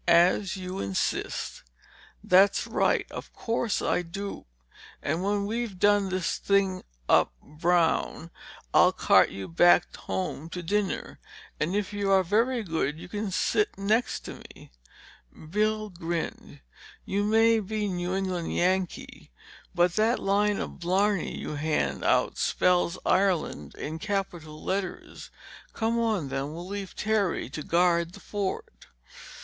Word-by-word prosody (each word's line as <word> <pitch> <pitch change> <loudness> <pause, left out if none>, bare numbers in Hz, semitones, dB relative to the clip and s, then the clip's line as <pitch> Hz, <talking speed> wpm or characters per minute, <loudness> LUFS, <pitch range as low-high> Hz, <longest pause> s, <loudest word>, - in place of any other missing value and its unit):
As 175 +3 +4
you 185 0 -5
insist—" 100 -1 -2 0.6
"That's 195 +2 +4
right. - - +1
Of - - -8
course 230 -2 -1
I - - +1
do. 195 - -7 0.6
And 155 +4 -1
when 200 0 0
we've 225 -2 -3
done 205 0 +3
this 185 -2 -1
thing 195 -2 +1 0.3
up - - +4
brown, 165 - 0 0.4
I'll - - +6
cart - - +4
you 95 0 -7
back 175 +1 +4
home 170 -4 -4
to 180 0 -6
dinner—and 190 -2 -3
if 205 0 -2
you 205 -1 -1
are 190 -1 +5
very 230 +6 +1
good 160 -5 -1
you 175 +2 -9
can 205 +2 -3
sit 420 - 0
next 215 +5 0
to - - -9
me!" - - -16 0.8
Bill 215 +1 0
grinned. 170 -1 -5 0.4
"You 200 +1 0
may 225 +2 +4
be 215 +1 -2
New 180 -1 -2
England 185 -3 -2
Yankee, 185 0 -1 0.5
but 175 +1 +2
that 225 +3 +3
line 205 +1 +1
of - - -5
blarney 190 +2 +1
you 150 - -5
hand 155 +1 -1
out - - +2
spells 180 -1 +2
Ireland 185 -3 +1
in 160 +2 -5
capital 175 -6 -4
letters! 190 -1 -4 0.4
Come 230 +1 0
on 215 -11 0
then, 135 +2 -3
we'll 170 +1 -7
leave 200 -1 -6
Terry 215 -4 0
to 155 - -5
guard 170 +1 +2
the - - -11
fort." 190 - -5
190 Hz, 135 wpm, -27 LUFS, 170-205 Hz, 0.8 s, I'll